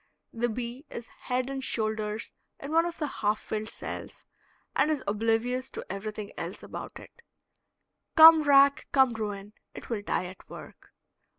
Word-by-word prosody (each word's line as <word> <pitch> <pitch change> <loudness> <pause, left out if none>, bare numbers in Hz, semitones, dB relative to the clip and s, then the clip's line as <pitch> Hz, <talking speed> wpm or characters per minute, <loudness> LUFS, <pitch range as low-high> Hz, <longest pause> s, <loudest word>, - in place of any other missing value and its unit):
The 240 +1 0
bee 240 +3 -5
is 235 - -7
head 250 +1 -3
and 270 -1 -4
shoulders 215 -2 -2 0.3
in 280 - -7
one 330 +2 +3
of 345 - -6
the 305 - -1
half 215 -6 -1
filled 215 0 -4
cells, - - -7 0.5
and - - +3
is 305 -3 -1
oblivious 225 +5 0
to - - -7
everything 210 +1 -5
else - - -6
about - - -8
it. 470 - -16 0.9
Come 320 0 +10
rack, 280 0 +5
come 265 -3 +4
ruin, 210 -2 -5 0.2
it - - -9
will 220 -3 -1
die 195 - -1
at 185 +1 -11
work. - - -12
235 Hz, 160 wpm, -28 LUFS, 215-275 Hz, 0.9 s, Come